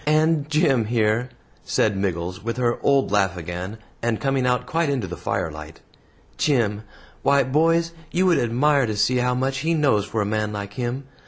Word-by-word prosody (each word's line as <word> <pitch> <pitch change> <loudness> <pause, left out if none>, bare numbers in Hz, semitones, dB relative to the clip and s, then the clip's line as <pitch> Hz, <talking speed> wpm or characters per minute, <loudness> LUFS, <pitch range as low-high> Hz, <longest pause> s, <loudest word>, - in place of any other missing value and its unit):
And 155 -1 +2
Jim 145 -7 +2
here," 115 +2 +1 0.3
said 105 -2 +1
Miggles, 90 -1 -3
with 115 +2 -3
her 120 -1 0
old 140 -1 +2
laugh 95 -3 +1
again, 90 +5 -5 0.2
and 115 -2 0
coming 135 -2 0
out 125 0 +1
quite 165 -1 0
into 130 -7 -1
the 90 -1 -6
firelight, 75 -1 -4 0.6
"Jim 115 -8 +1 0.4
why, 140 0 +4
boys, 165 +5 +2 0.2
you 180 +4 +1
would 180 -3 +4
admire 130 +3 +2
to 105 -1 -3
see 105 +5 +2
how 125 0 +1
much 135 +1 -1
he 165 +4 0
knows 135 -10 +2
for 110 +2 -3
a - - -3
man 105 0 -1
like 100 0 -5
him. 125 +2 -3
125 Hz, 180 wpm, -23 LUFS, 105-140 Hz, 0.6 s, why